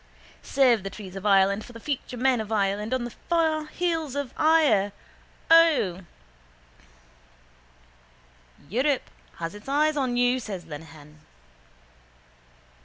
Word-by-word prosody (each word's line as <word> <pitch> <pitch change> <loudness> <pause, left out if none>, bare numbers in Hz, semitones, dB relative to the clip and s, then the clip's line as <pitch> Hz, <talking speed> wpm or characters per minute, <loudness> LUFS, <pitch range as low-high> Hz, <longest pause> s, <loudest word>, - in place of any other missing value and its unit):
Save 250 -6 +3
the 195 - -5
trees 195 -1 -10
of 195 +2 -4
Ireland 200 +1 +3
for 245 - -13
the 230 - -10
future 255 -1 -4
men 250 -1 +2
of 215 0 -8
Ireland 205 0 0
on 260 -1 0
the 240 - -5 0.2
fair 320 -2 +1
hills 325 -4 -2
of 285 -3 -4
Eire, 290 -11 +3 0.6
O. 305 - +5 2.7
—Europe 260 - 0 0.2
has 165 +1 -5
its 205 +5 -11
eyes 305 +2 +2
on 255 -3 0
you, 245 +1 +2
says 195 -7 -7
Lenehan. 150 -1 -12
240 Hz, 120 wpm, -25 LUFS, 195-285 Hz, 2.7 s, O